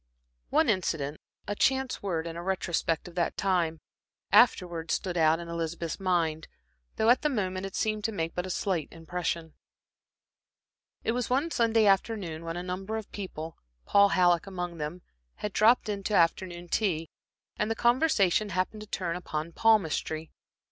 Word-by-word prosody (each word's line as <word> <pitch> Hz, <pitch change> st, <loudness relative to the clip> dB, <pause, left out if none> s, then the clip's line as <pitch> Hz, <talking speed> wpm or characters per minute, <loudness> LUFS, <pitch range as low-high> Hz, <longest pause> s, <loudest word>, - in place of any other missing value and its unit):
One 320 Hz, -, +3 dB
incident, 160 Hz, -, -1 dB, 0.3 s
a 205 Hz, -, -1 dB
chance 265 Hz, +4 st, +1 dB
word, 170 Hz, -5 st, -2 dB
in 165 Hz, -1 st, -5 dB
a 170 Hz, -, -5 dB
retrospect 175 Hz, -3 st, -1 dB
of 175 Hz, -, -11 dB
that 170 Hz, -1 st, -1 dB
time, 175 Hz, -4 st, +1 dB, 0.5 s
afterwards 175 Hz, -8 st, +4 dB
stood 180 Hz, -3 st, -3 dB
out 160 Hz, -1 st, +4 dB
in 170 Hz, -, -7 dB
Elizabeth's 170 Hz, 0 st, -3 dB
mind, 170 Hz, -4 st, 0 dB, 0.5 s
though 220 Hz, +2 st, +4 dB
at 250 Hz, -, +4 dB
the 300 Hz, -, +2 dB
moment 190 Hz, -6 st, -2 dB
it 195 Hz, -, -10 dB
seemed 215 Hz, -1 st, -1 dB
to 225 Hz, -, +1 dB
make 165 Hz, -5 st, -3 dB
but 180 Hz, +1 st, -3 dB
a -, -, -6 dB
slight 180 Hz, -4 st, -1 dB
impression. 165 Hz, -1 st, -4 dB, 1.5 s
It -, -, +1 dB
was 245 Hz, 0 st, -2 dB
one 280 Hz, +6 st, +1 dB
Sunday 225 Hz, -4 st, +3 dB
afternoon 195 Hz, -5 st, +1 dB
when 165 Hz, +1 st, -4 dB
a 175 Hz, -, -4 dB
number 190 Hz, +4 st, -4 dB
of 220 Hz, -, -7 dB
people, 165 Hz, -5 st, -7 dB, 0.3 s
Paul 200 Hz, 0 st, +5 dB
Halleck 175 Hz, -1 st, +3 dB
among 175 Hz, -3 st, -5 dB
them, 155 Hz, +4 st, -5 dB, 0.3 s
had 210 Hz, -1 st, -5 dB
dropped 230 Hz, +2 st, +4 dB
in 205 Hz, -2 st, -2 dB
to 210 Hz, -, +1 dB
afternoon 175 Hz, 0 st, +1 dB
tea, 165 Hz, -7 st, 0 dB, 0.5 s
and 210 Hz, -, 0 dB
the 225 Hz, -, 0 dB
conversation 235 Hz, -, +3 dB
happened 185 Hz, +4 st, -2 dB
to 215 Hz, -, -9 dB
turn 175 Hz, -4 st, -2 dB
upon 165 Hz, -2 st, -4 dB
palmistry. 165 Hz, -6 st, +1 dB
185 Hz, 165 wpm, -29 LUFS, 165-210 Hz, 1.5 s, Paul